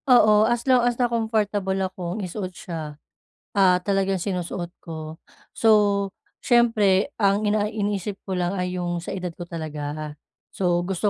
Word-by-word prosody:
Oo, 215 Hz, -3 st, +6 dB
as 240 Hz, 0 st, 0 dB
long 255 Hz, -2 st, +5 dB
as 240 Hz, 0 st, +1 dB
na 250 Hz, -, +3 dB
comfortable 215 Hz, -4 st, 0 dB
akong 185 Hz, +1 st, -3 dB
isuot 185 Hz, +1 st, -4 dB
siya, 155 Hz, -4 st, -6 dB, 0.6 s
ah, 185 Hz, -2 st, +6 dB
talagang 195 Hz, -1 st, 0 dB
sinusuot 180 Hz, -2 st, -3 dB
ko. 160 Hz, -1 st, -8 dB, 0.3 s
So, 225 Hz, -, +1 dB, 0.8 s
siyempre 225 Hz, -4 st, +4 dB
ang 200 Hz, 0 st, +3 dB
ina 210 Hz, 0 st, +1 dB
iniisip 205 Hz, -2 st, -3 dB
ko 190 Hz, -2 st, -2 dB
lang 175 Hz, +1 st, 0 dB
ay 180 Hz, -1 st, -2 dB
'yong 175 Hz, -1 st, -2 dB
sa -, -, -7 dB
edad 180 Hz, -2 st, -4 dB
ko 175 Hz, -, -8 dB
talaga, 155 Hz, -2 st, -5 dB, 0.4 s
so 175 Hz, -2 st, +1 dB
gusto 190 Hz, +3 st, 0 dB
190 Hz, 150 wpm, -24 LUFS, 175-210 Hz, 0.8 s, Oo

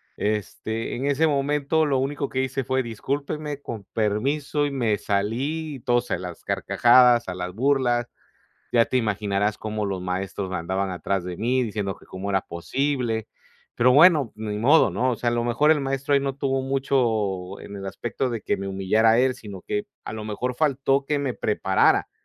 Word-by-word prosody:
Este, 110 Hz, +2 st, -3 dB
en 130 Hz, +3 st, -3 dB
ese 145 Hz, +3 st, +2 dB
momento 145 Hz, +2 st, +1 dB
lo 135 Hz, -3 st, +1 dB
único 140 Hz, +1 st, -2 dB
que 130 Hz, -, -1 dB
hice 130 Hz, +1 st, -2 dB
fue: 130 Hz, +2 st, 0 dB
"Discúlpenme, 140 Hz, +5 st, -4 dB
con 110 Hz, -6 st, -6 dB
permiso", 140 Hz, +8 st, 0 dB
y 145 Hz, -, -2 dB
me 115 Hz, -6 st, 0 dB
salí, 130 Hz, +11 st, -2 dB
y 130 Hz, -, -9 dB
todos 120 Hz, 0 st, +1 dB
a -, -, 0 dB
las 90 Hz, -2 st, -8 dB
carcajadas, 120 Hz, -2 st, +4 dB
a 90 Hz, -, -4 dB
las 90 Hz, 0 st, -5 dB
burlas. 120 Hz, -1 st, +1 dB, 0.6 s
Ya 115 Hz, -1 st, +4 dB
te 130 Hz, -, 0 dB
imaginarás 105 Hz, -2 st, 0 dB
cómo 110 Hz, -1 st, -3 dB
los 95 Hz, -1 st, -3 dB
maestros 95 Hz, +2 st, -3 dB
me 95 Hz, -, -1 dB
andaban 95 Hz, +3 st, -2 dB
atrás 95 Hz, +1 st, -2 dB
de 90 Hz, -1 st, -6 dB
mí 125 Hz, +3 st, +1 dB
diciendo 105 Hz, -3 st, -3 dB
que -, -, -19 dB
cómo 95 Hz, +2 st, -6 dB
era 95 Hz, -1 st, +2 dB
posible, 115 Hz, -, -2 dB, 0.5 s
pero 125 Hz, +2 st, +4 dB
bueno, 150 Hz, -5 st, +6 dB
ni 105 Hz, -1 st, -4 dB
modo, 140 Hz, -1 st, +5 dB
¿no? 125 Hz, +8 st, +1 dB
O 120 Hz, -, -1 dB
sea, 120 Hz, -, -1 dB
a 120 Hz, -, -1 dB
lo 120 Hz, 0 st, 0 dB
mejor 135 Hz, +6 st, +3 dB
el 150 Hz, -2 st, +3 dB
maestro 135 Hz, +1 st, -1 dB
ahí 140 Hz, -, +5 dB
no 135 Hz, -1 st, -2 dB
tuvo 135 Hz, -1 st, 0 dB
mucho 110 Hz, -9 st, 0 dB
en 100 Hz, -, -9 dB
el 95 Hz, -, -7 dB
aspecto 120 Hz, +6 st, -3 dB
de 115 Hz, -3 st, -4 dB
que -, -, -1 dB
me 100 Hz, -, -5 dB
humillara 105 Hz, +4 st, +3 dB
él, 130 Hz, +1 st, +3 dB
sino 100 Hz, -6 st, -10 dB
que 205 Hz, 0 st, -3 dB, 0.2 s
a -, -, -6 dB
lo 110 Hz, -, -5 dB
mejor 110 Hz, +4 st, -3 dB
faltó 135 Hz, -1 st, +1 dB
que 145 Hz, +2 st, 0 dB
me 140 Hz, -3 st, -1 dB
preparara, 95 Hz, -3 st, +2 dB
120 Hz, 195 wpm, -24 LUFS, 105-135 Hz, 0.6 s, bueno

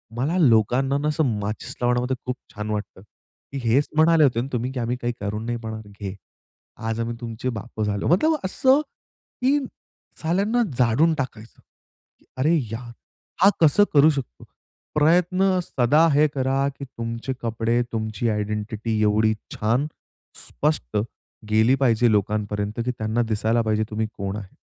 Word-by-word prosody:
मला 145 Hz, +9 st, 0 dB
लोकांना 130 Hz, -, +3 dB
ना 145 Hz, +1 st, -1 dB
असं 150 Hz, +1 st, +1 dB
माचिस 105 Hz, +1 st, -5 dB
लावण्यामध्ये 125 Hz, +1 st, +1 dB
खूप 125 Hz, 0 st, -2 dB, 0.2 s
छान 105 Hz, 0 st, -4 dB
वाटतं, 105 Hz, -2 st, -5 dB, 0.5 s
की 140 Hz, -, -4 dB
हेच 135 Hz, +6 st, +3 dB
म्हणाले 160 Hz, 0 st, +5 dB
होते 120 Hz, -4 st, +3 dB
ना 130 Hz, -, -4 dB
तुम्ही, 125 Hz, +1 st, -1 dB
की 130 Hz, -, -4 dB
आम्ही 120 Hz, +1 st, -1 dB
काही 120 Hz, 0 st, -1 dB
करू 105 Hz, +1 st, -3 dB
नाही 120 Hz, +2 st, -3 dB
म्हणणारे, 110 Hz, -1 st, -7 dB
घे. 95 Hz, -1 st, -5 dB, 0.7 s
आज 115 Hz, 0 st, -2 dB
आम्ही 115 Hz, 0 st, -2 dB
तुमचे 120 Hz, +2 st, -4 dB
बापं 110 Hz, -1 st, -5 dB
झालो. 100 Hz, -1 st, -1 dB
मतलब 310 Hz, -, +3 dB
असं, 260 Hz, +9 st, +3 dB, 0.6 s
की 275 Hz, +3 st, +3 dB, 0.6 s
साल्यांना 200 Hz, +9 st, +1 dB, 0.2 s
जाणळून 130 Hz, +7 st, +3 dB
टाकायचं. 120 Hz, -5 st, -6 dB, 0.8 s
अरे 150 Hz, +6 st, +2 dB, 0.2 s
यार! 120 Hz, +1 st, -6 dB, 0.5 s
हा, 195 Hz, -, +8 dB
कसं 160 Hz, +6 st, +6 dB
करू 150 Hz, +1 st, +7 dB
शकतो? 135 Hz, -, -4 dB, 0.5 s
प्रयत्न 180 Hz, +5 st, +3 dB
सदा 150 Hz, +4 st, +3 dB
हे 150 Hz, +2 st, +5 dB
करा, 135 Hz, +1 st, +1 dB
की 140 Hz, 0 st, -9 dB
तुमचे 115 Hz, +1 st, -5 dB
कपडे, 115 Hz, +1 st, 0 dB
तुमची 110 Hz, 0 st, -2 dB
आयडेंटिटी, 105 Hz, +1 st, -2 dB
एवढी 110 Hz, +1 st, +3 dB, 0.2 s
छान, 120 Hz, +7 st, +1 dB, 0.6 s
स्पष्ट -, -, -1 dB, 0.5 s
गेली 110 Hz, +4 st, +4 dB
पाहिजे 120 Hz, -3 st, +3 dB
लोकांपर्यंत, 105 Hz, +1 st, -1 dB
की 125 Hz, -, 0 dB
त्यांना 110 Hz, 0 st, -1 dB
दिसायला 110 Hz, +2 st, +1 dB
पाहिजे, 110 Hz, -1 st, +1 dB
तुम्ही 110 Hz, +1 st, -2 dB
कोण 100 Hz, 0 st, -3 dB
आहे? 100 Hz, -3 st, -10 dB
120 Hz, 150 wpm, -23 LUFS, 110-140 Hz, 0.8 s, हा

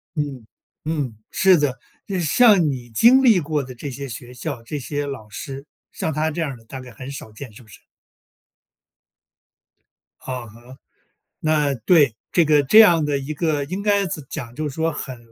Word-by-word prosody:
嗯， 140 Hz, -6 st, -4 dB, 0.4 s
嗯， 145 Hz, -8 st, -3 dB
是 190 Hz, -2 st, +5 dB
的， 140 Hz, -4 st, -1 dB, 0.3 s
就 200 Hz, -, -3 dB
是 180 Hz, -, -1 dB
像 205 Hz, +5 st, +5 dB
你 125 Hz, -3 st, -5 dB
经 235 Hz, -, +5 dB
历 225 Hz, -7 st, +6 dB
过 150 Hz, -2 st, -2 dB
的 130 Hz, 0 st, -9 dB
这 140 Hz, +4 st, -6 dB
些 140 Hz, +2 st, -6 dB
学 120 Hz, +2 st, -9 dB
校、 125 Hz, -1 st, -5 dB
这 145 Hz, +6 st, -5 dB
些 145 Hz, +2 st, -3 dB
老 135 Hz, -7 st, -7 dB
师， 135 Hz, +6 st, -7 dB, 0.3 s
像 160 Hz, -, -3 dB
她 155 Hz, +2 st, 0 dB
这 165 Hz, -, -3 dB
样 155 Hz, -4 st, -2 dB
儿 130 Hz, -, -9 dB
的 115 Hz, -, -20 dB
大 130 Hz, +3 st, -8 dB
概 125 Hz, -1 st, -12 dB
很 130 Hz, +4 st, -9 dB
少 135 Hz, -5 st, -9 dB
见， 120 Hz, +3 st, -10 dB
是 105 Hz, -, -14 dB
不 -, -, -22 dB
是？ -, -, -15 dB, 2.5 s
嗯 125 Hz, -2 st, -5 dB
哼。 120 Hz, +4 st, -15 dB, 0.6 s
那， 150 Hz, -2 st, +1 dB
对， 145 Hz, -10 st, +5 dB, 0.2 s
这 170 Hz, -, +3 dB
个 150 Hz, -1 st, +4 dB
这 175 Hz, +11 st, +6 dB
样 175 Hz, -8 st, +7 dB
的 145 Hz, -1 st, 0 dB
一 140 Hz, +2 st, -5 dB
个 155 Hz, -2 st, -1 dB
应 185 Hz, +7 st, -4 dB
该 200 Hz, -1 st, +2 dB
怎 155 Hz, -4 st, -5 dB
讲 120 Hz, -6 st, -6 dB
就 155 Hz, +2 st, -3 dB
是 140 Hz, -, -7 dB
说 160 Hz, 0 st, 0 dB
很 130 Hz, -4 st, -6 dB
145 Hz, 210 characters per minute, -21 LUFS, 130-160 Hz, 2.5 s, 样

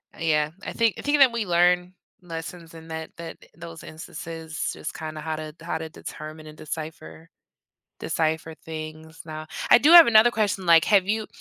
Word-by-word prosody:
uh, -, -, -17 dB
yeah, 150 Hz, -2 st, +1 dB
I -, -, -5 dB
think 230 Hz, -5 st, +1 dB
I -, -, -5 dB
think 290 Hz, 0 st, +1 dB
that 270 Hz, -3 st, +7 dB
we 230 Hz, -2 st, -2 dB
learn 180 Hz, 0 st, +2 dB, 0.3 s
lessons 165 Hz, -1 st, -8 dB
in 165 Hz, 0 st, -12 dB
that 160 Hz, 0 st, -6 dB
that 165 Hz, -1 st, -8 dB, 0.2 s
those 165 Hz, -1 st, -10 dB
instances, 160 Hz, 0 st, -6 dB
just -, -, -7 dB
kinda 155 Hz, -1 st, -7 dB
how 160 Hz, 0 st, -3 dB
to 155 Hz, -1 st, -7 dB
how 165 Hz, -1 st, -3 dB
to 160 Hz, 0 st, -6 dB
determine 155 Hz, 0 st, -9 dB
and 155 Hz, 0 st, -12 dB
decipher 150 Hz, -, -8 dB, 0.7 s
decipher 160 Hz, 0 st, -2 dB
things 160 Hz, 0 st, -8 dB
now, 155 Hz, 0 st, -7 dB, 0.2 s
I -, -, +10 dB
do 300 Hz, +6 st, +5 dB
have 345 Hz, -1 st, +11 dB
another 230 Hz, 0 st, +6 dB
question, 205 Hz, -4 st, -1 dB
like, 165 Hz, -1 st, +6 dB
have 200 Hz, -3 st, +4 dB
you 215 Hz, +1 st, -1 dB
165 Hz, 185 wpm, -24 LUFS, 155-180 Hz, 0.7 s, have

